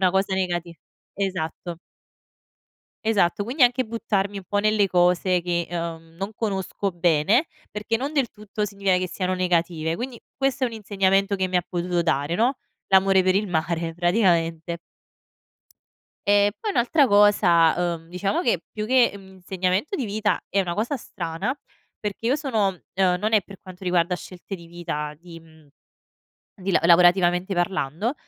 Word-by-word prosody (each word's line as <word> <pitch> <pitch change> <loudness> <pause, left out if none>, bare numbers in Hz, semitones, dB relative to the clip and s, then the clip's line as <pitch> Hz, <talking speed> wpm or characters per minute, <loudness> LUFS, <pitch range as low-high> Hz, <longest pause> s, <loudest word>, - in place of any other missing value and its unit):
una 185 -1 +4
cosa 190 0 +1
negati 175 -2 -2 0.4
esatto. 175 -3 -3 1.3
Esatto. 205 -3 +2
Quindi 255 +5 -1
anche 250 +1 +4
buttarmi 205 -3 -2
un 195 - -7
po' 205 - -1
nelle 215 -1 +3
cose 180 0 +2
che, 170 -1 -1
ehm, 165 -1 -6
non 195 +3 -4
conosco 200 -2 -2
bene 175 - +2 0.2
perché 210 +2 -2
non 275 +5 -4
del 275 -5 +1
tutto 210 0 -4
significa 195 -2 +1
che 185 0 -2
siano 185 +1 -2
negative. 170 -2 0
Quindi 245 -1 -6 0.2
questo 270 -1 0
è - - +3
un 230 - -6
insegnamento 195 -1 +1
che 190 -1 -1
mi 180 - 0
ha 175 - +1
potuto 175 -1 -1
dare, 145 0 0
no, 245 +6 +1 0.3
l'amore 190 0 +5
per 185 0 +2
il 205 -1 0
mare, 165 0 -1
praticamente. 170 -3 +1 1.5
E 205 0 +4
poi 430 - -2
un'altra 275 +3 +3
cosa, 175 -5 +4
uhm, 165 0 -17
diciamo 195 +3 -1
che 185 -9 +1
più 215 0 -4
che, 255 0 +4
mhmm, 195 - -12
un 190 - -16
insegnamento 185 - -1
di 265 - -2
vita 210 -1 0
è 200 - +2
una 175 -2 -2
cosa 235 +7 -1
strana 170 - -4 0.4
perché 210 +2 -4
io 260 +5 +3
sono 220 - 0 0.2
ehm, 185 -1 +2
non 215 +3 -1
è 215 - +5
per 195 +2 -13
quanto 185 0 -12
riguarda 180 0 +2
scelte 180 +2 -9
di 170 -3 -10
vita 150 -3 -5
di, 170 -1 -12
mhmm, 160 -1 -20 1.0
di 195 +1 -1
la - - +4
lavorativamente 175 +2 +4
parlando, 175 - -1
190 Hz, 165 wpm, -24 LUFS, 175-210 Hz, 1.5 s, l'amore